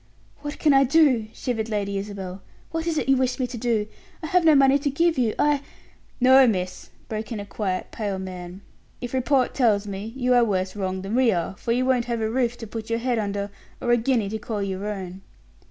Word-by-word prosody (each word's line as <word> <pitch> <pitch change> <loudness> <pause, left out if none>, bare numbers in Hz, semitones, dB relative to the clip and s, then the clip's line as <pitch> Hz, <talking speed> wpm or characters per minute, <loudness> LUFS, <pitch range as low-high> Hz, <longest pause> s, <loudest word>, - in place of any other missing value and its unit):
"What 290 0 -5
can 300 -2 +3
I 270 0 +6
do?" 270 -5 +4
shivered 225 -2 -3
Lady 200 -2 -2
Isabel. 195 -2 -6 0.3
"What 325 +1 -3
is 325 -2 0
it - - -1
you 270 0 +4
wish 255 -1 0
me 260 - 0
to 250 0 -7
do? 230 -2 0 0.4
I - - -2
have 360 +1 +3
no 315 -2 +6
money 275 0 +5
to 285 - 0
give 330 +4 +2
you, 235 -4 +1
I 295 -1 +2 0.3
" - - -33
"No, 260 0 +8
miss," 185 -4 -2 0.2
broke 220 +2 -5
in 225 - -3
a 200 - -6
quiet, 190 -3 -3
pale 205 -3 -3
man; 185 0 -7 0.4
"if 245 0 -6
report 260 0 +2
tells 215 -5 +2
me, 200 +2 -5
you 250 -1 +1
are 245 -1 +5
worse 190 -3 -1
wronged 190 -2 -3
than 195 +2 -4
we 250 -1 +4
are, 175 0 -2
for 230 - -3
you 250 +2 +2
won't 255 -2 +2
have 235 -1 -2
a 220 0 -1
roof 240 -1 0
to 225 - -7
put 220 +1 -7
your 230 - +1
head 240 0 0
under, 200 -1 -3 0.3
or 240 - 0
a 240 - +5
guinea 235 -3 +1
to 220 +1 -4
call 210 -1 -3
your 195 +1 -3
own." 190 -2 -5
230 Hz, 235 wpm, -24 LUFS, 200-260 Hz, 0.4 s, No